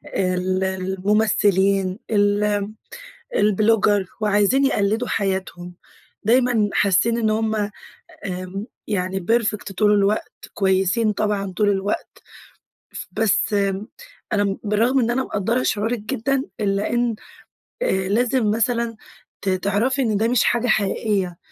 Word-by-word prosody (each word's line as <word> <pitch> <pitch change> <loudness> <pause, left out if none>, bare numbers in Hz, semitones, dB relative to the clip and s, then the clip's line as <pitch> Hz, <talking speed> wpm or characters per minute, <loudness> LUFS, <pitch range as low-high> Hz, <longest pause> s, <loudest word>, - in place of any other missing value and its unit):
ال 185 0 0
الممثلين 190 0 +1
ال 205 -1 +2 0.7
البلوجر 210 -1 +3
وعايزين 210 +6 +3
يقلّدوا 220 -1 +1
حياتهم، 190 -3 -3 0.5
دايمًا 235 -2 +3
حاسّين 205 +4 +2
إن 220 -2 +1
هُم 220 0 0 0.7
آمم 185 +2 -5 0.2
يعني 190 -2 -2
perfect 210 -4 0
طول 210 -1 +4
الوقت، 205 +1 -1
كويسين 195 +3 +2
طبعًا 200 -2 -1
طول 210 -1 +3
الوقت. 200 0 -2 0.7
ف - - -6
بس 220 -1 +1 0.8
أنا 205 -1 +1
بالرغم 225 +6 +2
إن 240 -1 +1
أنا 260 +2 0
مقدّرة 230 +5 -1
شعورِك 220 +3 0
جدًا، 260 +6 -1 0.2
إلّا 200 -1 0
إن 240 -2 0 0.7
آآ - - +1 0.2
لازم 235 0 +1
مثلًا 230 +1 0 0.5
ت 195 - -1
تعرَفي 205 +8 0
إن 220 -4 +1
ده 220 +2 +1
مش 240 -1 +3
حاجة 240 +1 +1
حقيقية، 195 -4 0
210 Hz, 115 wpm, -21 LUFS, 195-225 Hz, 0.8 s, طول